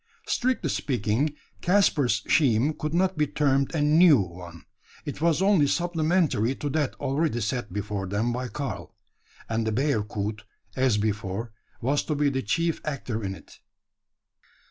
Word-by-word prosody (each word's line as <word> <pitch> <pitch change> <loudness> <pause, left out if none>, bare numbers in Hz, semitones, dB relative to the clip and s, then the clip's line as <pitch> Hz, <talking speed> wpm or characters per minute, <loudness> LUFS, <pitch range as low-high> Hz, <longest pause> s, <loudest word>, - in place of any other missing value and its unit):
Strictly 255 +1 0
speaking, 125 +4 0 0.3
Caspar's 175 -9 +2
scheme 135 0 +3
could 155 +1 -3
not 185 -1 +1
be 150 - +3
termed 140 +1 +1
a 150 - +1
new 155 +1 +6
one. 85 -2 -7 0.4
It - - -6
was 170 +2 +2
only 195 -7 +4
supplementary 160 - +1
to 145 - -4
that 145 -2 0
already 140 -2 -1
set 120 0 -2
before 100 0 -3
them 105 +5 -1
by 125 +1 -3
Karl; 140 +2 -6 0.5
and 110 0 -1
the - - +1
bearcoot, 105 -5 -1 0.3
as 130 -4 +2
before, 105 +1 -2 0.3
was 140 +4 +1
to 150 - -1
be 145 -1 +2
the 130 -1 -1
chief 165 +9 0
actor 125 -7 -4
in 95 -1 -3
it. 80 - -16
135 Hz, 145 wpm, -26 LUFS, 110-155 Hz, 0.5 s, new